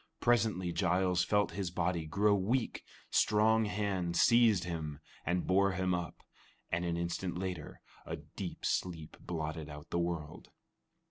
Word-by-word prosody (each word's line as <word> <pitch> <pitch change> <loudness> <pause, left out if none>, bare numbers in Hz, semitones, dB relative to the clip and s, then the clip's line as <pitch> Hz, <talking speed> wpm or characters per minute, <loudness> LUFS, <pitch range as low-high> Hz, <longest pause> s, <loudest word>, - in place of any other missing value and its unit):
Presently 110 -7 +2
Giles 90 +1 +2
felt 105 +2 +2
his 100 -3 -3
body 85 -2 -1
grow 100 +6 +3
weak, 110 +6 0 0.3
strong 110 +1 +4
hands 95 -5 -1
seized 115 -6 +5
him 80 -4 -4 0.3
and 90 0 +1
bore 100 +1 +3
him 95 0 0
up, 85 -2 -4 0.5
and 85 +1 0
an 85 -1 -1
instant 85 +1 -2
later 90 -4 -5 0.2
a - - -4
deep - - -7
sleep 80 -4 -2
blotted 80 -2 -4
out 75 +1 -10
the 85 - +1
world. 85 -3 -4
90 Hz, 140 wpm, -33 LUFS, 85-100 Hz, 0.5 s, seized